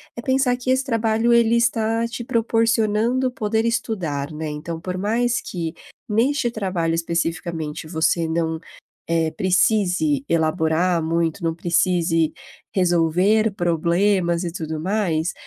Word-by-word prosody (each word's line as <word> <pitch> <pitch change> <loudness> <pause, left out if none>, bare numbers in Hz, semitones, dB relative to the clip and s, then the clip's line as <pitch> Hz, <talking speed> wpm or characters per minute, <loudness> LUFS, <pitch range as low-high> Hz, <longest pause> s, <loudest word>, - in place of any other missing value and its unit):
é 235 - -6
pensar 260 -1 +2
que 255 +1 -1
esse 260 +1 +2
trabalho, 230 -2 +1
ele 235 -1 +4
está 230 -1 +1
te 235 0 -6
proporcionando 230 +2 +1
poder 220 -2 -1
estudar, 175 - -2
né, 155 0 -5
então 160 +2 -5
por 185 +1 -4
mais 235 +5 0
que 165 -2 -5 0.3
neste 240 +4 +1
trabalho 185 -7 -1
especificamente 165 -2 -3
você 165 0 +1
não, 160 0 -1 0.5
eh, 165 -1 +1
precise 210 - +1
elaborar 165 +1 +1
muito, 165 +2 -1
não 165 -1 0
precise 170 -1 +1 0.4
resolver 180 +4 +2
problemas 175 +1 +1
e 170 - -3
tudo 160 -2 -4
mais, 175 -3 0
185 Hz, 125 wpm, -22 LUFS, 165-225 Hz, 0.5 s, ele